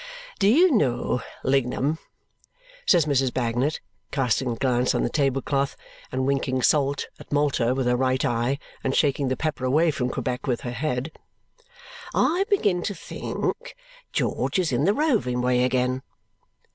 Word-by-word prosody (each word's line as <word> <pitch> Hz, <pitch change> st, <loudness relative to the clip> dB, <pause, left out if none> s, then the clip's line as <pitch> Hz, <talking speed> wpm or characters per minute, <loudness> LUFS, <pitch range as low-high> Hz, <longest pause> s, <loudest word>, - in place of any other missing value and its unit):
"Do 195 Hz, -, +4 dB
you 330 Hz, -, +6 dB
know, 130 Hz, -, +1 dB, 0.2 s
Lignum," 135 Hz, +3 st, +1 dB, 0.9 s
says 170 Hz, -4 st, +5 dB
Mrs. 135 Hz, -3 st, +1 dB
Bagnet, 125 Hz, +4 st, -1 dB, 0.3 s
casting 130 Hz, -2 st, 0 dB
a 120 Hz, -, -1 dB
glance 125 Hz, 0 st, +1 dB
on -, -, +1 dB
the -, -, -1 dB
table 135 Hz, -2 st, +1 dB
cloth, 140 Hz, -1 st, 0 dB, 0.4 s
and 130 Hz, 0 st, -1 dB
winking 130 Hz, -2 st, 0 dB
"salt!" 140 Hz, 0 st, +2 dB
at -, -, -14 dB
Malta 140 Hz, -4 st, +1 dB
with 130 Hz, -1 st, -1 dB
her 125 Hz, 0 st, +3 dB
right 130 Hz, +1 st, +1 dB
eye, 120 Hz, +2 st, 0 dB, 0.3 s
and 135 Hz, -, 0 dB
shaking 140 Hz, -2 st, +2 dB
the 130 Hz, 0 st, -1 dB
pepper 155 Hz, -3 st, -2 dB
away 155 Hz, +6 st, +3 dB
from 125 Hz, -3 st, -2 dB
Quebec 125 Hz, +2 st, -3 dB
with 125 Hz, -2 st, 0 dB
her 120 Hz, -, -4 dB
head, 130 Hz, +3 st, -2 dB, 1.0 s
"I 370 Hz, +4 st, +2 dB
begin 205 Hz, -, +2 dB
to 200 Hz, +2 st, -3 dB
think -, -, -4 dB, 0.4 s
George -, -, 0 dB
is 180 Hz, -5 st, +1 dB
in 130 Hz, +4 st, +1 dB
the 200 Hz, +3 st, +3 dB
roving 225 Hz, -, +1 dB
way 125 Hz, 0 st, +2 dB
again. 130 Hz, 0 st, +1 dB
135 Hz, 160 wpm, -25 LUFS, 125-155 Hz, 1.0 s, you